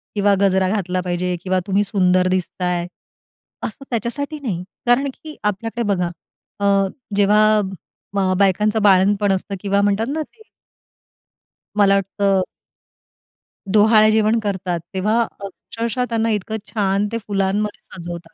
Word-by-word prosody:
किंवा 205 -1 +3
गजरा 190 -1 +3
घातला 185 -2 -1
पाहिजे 180 0 -2
किंवा 185 0 +1
तुम्ही 200 +1 +2
सुंदर 185 -3 +2
दिसताय, 180 -1 -1 0.8
असं 225 +5 -10
त्याच्यासाठी 275 +6 -3
नाही. 200 -11 -3 0.2
कारण 245 +3 +3
की 310 +2 -11
आपल्याकडे 225 +3 -2
बघा 180 -2 -1 0.5
अ, 200 - -1 0.5
जेव्हा 205 +1 +4 0.7
अ, 190 -1 +2
बायकांचं 210 +3 +2
बाळंतपण 200 +1 +4
असतं 195 +1 -3
किंवा 200 0 +1
म्हणतात 205 +3 +1
ना 315 - -1
ते 440 +8 -11 1.3
मला 200 -1 +5
वाटतं 195 0 +1 1.3
डोहाळे 215 +1 +5
जेवण 220 +1 +3
करतात, 185 -3 -2
तेव्हा 210 +5 +1 0.2
अक्षरशः 225 +5 -4
त्यांना 230 0 0
इतकं 215 +1 -2 0.2
छान 200 -1 +1
ते 230 - -1
फुलांमध्ये 205 +1 -1
सजवतात. 170 -1 -8
200 Hz, 125 wpm, -20 LUFS, 185-215 Hz, 1.3 s, मला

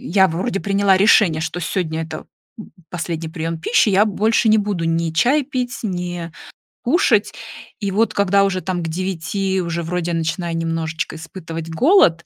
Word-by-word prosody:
Я 195 -7 +3
вроде 190 +5 -2
приняла 200 -1 +2
решение, 190 -4 +4
что 160 +2 -3
сегодня- 165 -2 -2
это 155 -1 -8 0.6
последний 170 -2 -4
прием 165 0 -4
пищи, 215 +7 +2
я 200 +1 +4
больше 220 +2 +1
не 220 0 +5
буду 200 -5 -2
ни 165 0 0
чай 260 - +3
пить, 250 -4 -3
ни 175 -4 -4 0.5
кушать. 235 - +2 0.5
И 200 -3 -2
вот 220 +4 +1
когда 200 0 +3
уже 195 -2 0
там 180 -2 -3
к 165 - -3
9, 190 +2 -2
уже 170 -1 -3
вроде 175 +1 -2
начинаю 165 +1 -2
немножечко 165 -1 -3
испытывать 165 0 -7
голод, 170 - +4
180 Hz, 155 wpm, -20 LUFS, 165-205 Hz, 0.6 s, не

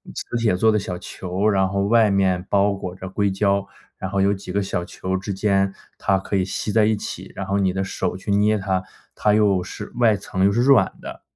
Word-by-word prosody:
磁 120 - -4
铁 110 -5 +2
做 110 +3 +3
的 105 - +2
小 90 -2 -4
球， 95 +3 -3
然 95 -2 +2
后 100 0 0
外 115 -1 +4
面 95 -2 +1
包 100 0 +3
裹 90 -2 -6
着 95 0 -8
硅 100 +1 0
胶， 100 0 +1 0.3
然 95 - -4
后 100 -1 +1
有 100 +1 +3
几 95 - -7
个 100 - 0
小 95 -2 -2
球 95 0 -4
之 100 +1 -4
间， 95 -1 +1 0.2
它 95 - +1
可 100 - -4
以 95 - +2
吸 105 +2 -3
在 110 -1 +4
一 110 0 +2
起， - - -7
然 - - -4
后 100 +1 0
你 95 -2 +1
的 95 0 -1
手 95 - -3
去 95 - -8
捏 105 +1 +3
它， 95 -1 -1 0.3
它 105 - +2
又 100 -4 +3
是 105 +3 -8
外 115 -3 +4
层 95 -1 -1
又 100 - +4
是 120 +4 +1
软 135 0 +5
的。 - - -8
100 Hz, 255 characters per minute, -22 LUFS, 95-105 Hz, 0.3 s, 软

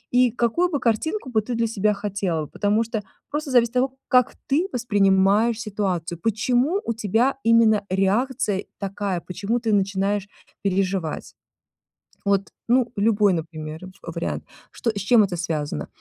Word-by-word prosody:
и 250 -2 +5
какую 245 +10 +1
бы 295 -5 -1
картинку 260 - -1
бы 220 - +2
ты 235 +3 -4
для 230 0 +1
себя 210 -1 +1
хотела, 195 -6 -2
потому 210 +8 +1
что 225 -1 -3 0.3
просто 295 -1 -3
зависит 240 -1 +3
от - - +5
того, 265 0 -2
как 250 -2 +3 0.2
ты 320 +7 +3
воспринимаешь 205 0 +3
ситуацию, 185 -6 -2
почему 250 - +1
у 230 - 0
тебя 225 +5 +1
именно 225 -2 +5
реакция 205 +2 +1 0.2
такая, 195 -2 -3
почему 205 +6 -2
ты 225 -2 -1
начинаешь 200 0 0 0.4
переживать? 190 -4 -1 0.9
Вот, 200 0 +1 0.2
ну, 245 -1 +3
любой, 205 -2 +3
например, 155 +1 -5 0.2
в 170 - -6
вариант, 170 - -3 0.3
что 230 - -2
с 205 -2 -5
чем 220 +2 +5
это 185 -3 -2
связано? 155 - -3
210 Hz, 150 wpm, -23 LUFS, 190-235 Hz, 0.9 s, и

